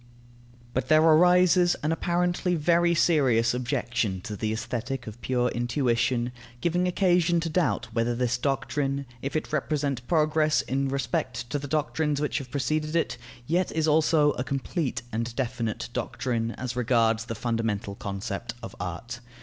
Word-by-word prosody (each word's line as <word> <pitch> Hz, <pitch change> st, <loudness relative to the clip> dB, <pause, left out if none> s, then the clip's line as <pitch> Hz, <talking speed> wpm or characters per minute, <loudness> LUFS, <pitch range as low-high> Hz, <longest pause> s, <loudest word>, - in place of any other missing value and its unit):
But 130 Hz, -, -1 dB
there 155 Hz, 0 st, +5 dB
arises 180 Hz, +2 st, +5 dB
an 155 Hz, -, +1 dB
apparently 175 Hz, +2 st, 0 dB
very 170 Hz, +2 st, +3 dB
serious 130 Hz, -9 st, +3 dB
objection 120 Hz, -5 st, -1 dB
to 105 Hz, -, -6 dB
the 110 Hz, +1 st, -2 dB
Aesthetic 120 Hz, +3 st, -3 dB
of 110 Hz, +2 st, -9 dB
pure 125 Hz, +3 st, +1 dB
intuition, 120 Hz, 0 st, 0 dB, 0.3 s
giving 175 Hz, +5 st, +1 dB
occasion 175 Hz, -2 st, +3 dB
to 165 Hz, -, -2 dB
doubt 150 Hz, -, +1 dB
whether 115 Hz, +1 st, +1 dB
this 125 Hz, 0 st, 0 dB
doctrine, 140 Hz, +1 st, -1 dB, 0.2 s
if 135 Hz, -, -4 dB
it 155 Hz, -, -2 dB
represent 140 Hz, -4 st, -1 dB
progress 155 Hz, -1 st, +2 dB
in 135 Hz, +1 st, -1 dB
respect 135 Hz, -3 st, -2 dB
to 145 Hz, -, 0 dB
the 145 Hz, -, -6 dB
doctrines 150 Hz, 0 st, 0 dB
which 150 Hz, +1 st, -1 dB
have 135 Hz, -3 st, -8 dB
preceded 155 Hz, +3 st, -1 dB
it, 165 Hz, -7 st, 0 dB, 0.3 s
yet 175 Hz, +7 st, +1 dB
is 160 Hz, 0 st, +1 dB
also 155 Hz, -1 st, +4 dB
a 125 Hz, -, -3 dB
complete 135 Hz, 0 st, -2 dB
and 115 Hz, +1 st, -3 dB
definite 115 Hz, -, -2 dB
doctrine 115 Hz, -2 st, -2 dB
as 125 Hz, -2 st, -5 dB
regards 115 Hz, -2 st, +2 dB
the 115 Hz, -, -5 dB
fundamental 115 Hz, -3 st, -2 dB
concept 100 Hz, +3 st, -5 dB
of 115 Hz, -, -7 dB
art. 90 Hz, +8 st, -5 dB
135 Hz, 150 wpm, -27 LUFS, 120-155 Hz, 0.3 s, there